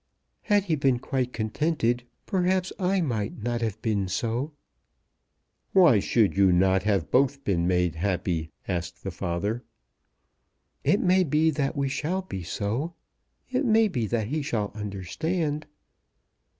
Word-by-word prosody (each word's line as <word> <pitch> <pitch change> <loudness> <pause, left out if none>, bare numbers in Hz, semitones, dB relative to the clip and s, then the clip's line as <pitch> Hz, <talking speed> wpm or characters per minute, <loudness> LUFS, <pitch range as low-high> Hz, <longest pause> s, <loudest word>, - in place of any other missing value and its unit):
Had 205 -2 +2
he 170 -5 0
been 135 -4 +2
quite 125 0 -2
contented 120 +1 0 0.2
perhaps 185 0 +1
I 190 0 +2
might 110 -8 -2
not 120 0 -1
have 110 -2 -2
been 105 -4 0
so." 115 - -2 1.2
"Why 170 - +6
should 105 0 +2
you 95 -1 +5
not 95 +1 +3
have 100 -4 0
both 140 +1 +2
been 85 -3 +1
made 90 -2 +2
happy?" 90 -3 -1 0.2
asked 85 -1 -4
the 95 - -3
father. 100 +7 -2 1.2
"It 200 - +3
may 185 +1 +4
be 155 0 +2
that 140 0 -1
we 140 -1 0
shall 170 +8 -2
be 95 - -6
so. 110 - -3 0.6
It 255 +3 +1
may 225 -3 +4
be 120 - -2
that 110 -1 -1
he 155 +2 -1
shall 110 -8 -2
understand." 145 - -3
120 Hz, 140 wpm, -26 LUFS, 100-160 Hz, 1.2 s, Why